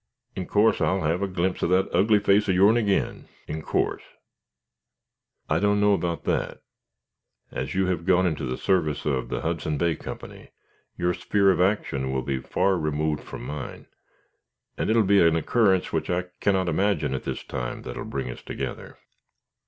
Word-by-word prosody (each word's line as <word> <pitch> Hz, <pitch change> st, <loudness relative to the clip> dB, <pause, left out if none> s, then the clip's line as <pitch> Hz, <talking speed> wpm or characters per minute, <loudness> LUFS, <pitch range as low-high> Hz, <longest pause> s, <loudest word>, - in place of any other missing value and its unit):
In 90 Hz, -, -4 dB
course 105 Hz, +2 st, +3 dB
I'll 95 Hz, -1 st, +1 dB
have 80 Hz, +4 st, 0 dB
a 100 Hz, -, 0 dB
glimpse 90 Hz, 0 st, -1 dB
of -, -, +1 dB
that 95 Hz, +1 st, +3 dB
ugly 105 Hz, +2 st, +4 dB
face 100 Hz, 0 st, +3 dB
of 95 Hz, -, +3 dB
your'n 100 Hz, +4 st, +5 dB
agin. 105 Hz, -4 st, 0 dB, 0.2 s
In 80 Hz, +1 st, -4 dB
course." -, -, -1 dB, 1.5 s
"I -, -, +1 dB
don't 105 Hz, 0 st, +2 dB
know 105 Hz, 0 st, +4 dB
about 85 Hz, -4 st, -1 dB
that. -, -, -2 dB, 0.9 s
As 65 Hz, +6 st, -4 dB
you 95 Hz, 0 st, +2 dB
have 90 Hz, -1 st, -2 dB
gone 95 Hz, 0 st, +4 dB
into 80 Hz, -4 st, -1 dB
the 65 Hz, -, -3 dB
service 80 Hz, -6 st, 0 dB
of 65 Hz, -4 st, -1 dB
the -, -, -3 dB
Hudson 80 Hz, -1 st, -2 dB
Bay 85 Hz, +1 st, +1 dB
Company, -, -, -9 dB, 0.5 s
your 90 Hz, 0 st, +1 dB
sphere 100 Hz, +2 st, +2 dB
of 90 Hz, -, +1 dB
action 70 Hz, -9 st, 0 dB
will 65 Hz, -1 st, -1 dB
be 65 Hz, -1 st, -2 dB
far 95 Hz, +7 st, +1 dB
removed 75 Hz, -1 st, -1 dB
from -, -, -8 dB
mine, 75 Hz, +1 st, -6 dB, 0.9 s
and -, -, -2 dB
it 110 Hz, -, +3 dB
will 115 Hz, -, +5 dB
be 100 Hz, 0 st, +4 dB
an 85 Hz, -1 st, +4 dB
occurrence 95 Hz, +2 st, +2 dB
which 80 Hz, -, -1 dB
I 90 Hz, 0 st, 0 dB, 0.2 s
cannot 95 Hz, -2 st, +1 dB
imagine 85 Hz, -4 st, +1 dB
at 65 Hz, -, -2 dB
this -, -, -4 dB
time 65 Hz, -2 st, -5 dB
that -, -, -7 dB
will -, -, -5 dB
bring 65 Hz, -3 st, -4 dB
us -, -, -10 dB
together." -, -, -6 dB
90 Hz, 185 wpm, -25 LUFS, 75-100 Hz, 1.5 s, your'n